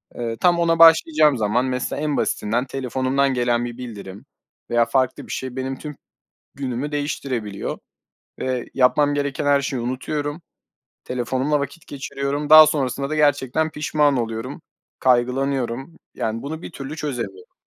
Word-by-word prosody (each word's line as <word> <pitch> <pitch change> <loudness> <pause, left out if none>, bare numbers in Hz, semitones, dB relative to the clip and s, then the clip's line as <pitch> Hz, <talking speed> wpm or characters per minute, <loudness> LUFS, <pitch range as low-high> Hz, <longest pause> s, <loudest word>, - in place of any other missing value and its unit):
Eee, 115 -1 -4
tam 175 -1 +3
ona 165 -1 +2
başlayacağım 155 -3 +6
zaman 110 +4 +1
mesela 130 +2 -2
en 150 -2 -1
basitinden 120 +5 0
telefonumdan 135 +1 0
gelen 120 -1 +1
bir 120 0 -7
bildirim 105 -5 -9 0.4
veya 120 0 +3
farklı 130 +2 0
bir - - -8
şey 130 -1 -4
benim 130 0 -3
tüm 150 -1 -7 0.6
günümü 135 +1 -3
değiştirebiliyor 130 -8 -3 0.6
ve 130 -2 -2
yapmam 145 +3 +3
gereken 140 -1 -2
her 140 -1 +4
şeyi 135 -3 -3
unutuyorum. 145 +5 -3 0.6
Telefonumla 130 +4 -1
vakit 155 +4 -6
geçiriyorum. 140 +1 -4
Daha 155 0 +10
sonrasında 140 -1 -1
da 155 - -2
gerçekten 145 +1 +2
pişman 150 -2 +1
oluyorum. 115 +5 -4 0.4
Kaygılanıyorum 130 +3 0 0.2
yani 115 +1 -2
bunu 155 +4 -6
bir - - -8
türlü 140 0 -7
çözemiyorum. 120 - -5
135 Hz, 140 wpm, -22 LUFS, 125-145 Hz, 0.6 s, Daha